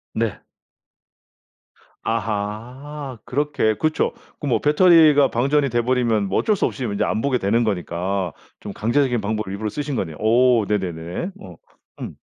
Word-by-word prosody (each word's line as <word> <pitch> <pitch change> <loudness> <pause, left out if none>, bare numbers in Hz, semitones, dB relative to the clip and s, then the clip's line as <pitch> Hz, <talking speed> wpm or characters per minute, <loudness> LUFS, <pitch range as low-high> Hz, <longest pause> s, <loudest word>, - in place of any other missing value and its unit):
네. 115 -2 -2 1.6
아하! 115 +6 -4
그렇게 130 -4 0
그쵸. 155 +5 0 0.3
그 145 - -4
뭐 125 - +2
배터리가 150 -3 +5
방전이 140 +4 +1
돼 120 -1 +1
버리면 115 -4 +1
뭐 - - 0
어쩔 215 - +2
수 - - 0
없이 130 - -3
인제 100 -4 -1
안 110 - -1
보게 135 -1 +1
되는 115 +4 +1
거니까 90 -3 -2 0.3
좀 100 - -7
강제적인 120 +1 +1
방법을 105 -1 -3
일부러 105 +2 -3
쓰신 145 +3 -4
거네요. 80 -9 -3
오 120 0 +4
네네네. 90 - -3
어. - - -11 0.5
음. - - -6
115 Hz, 290 characters per minute, -22 LUFS, 105-140 Hz, 1.6 s, 배터리가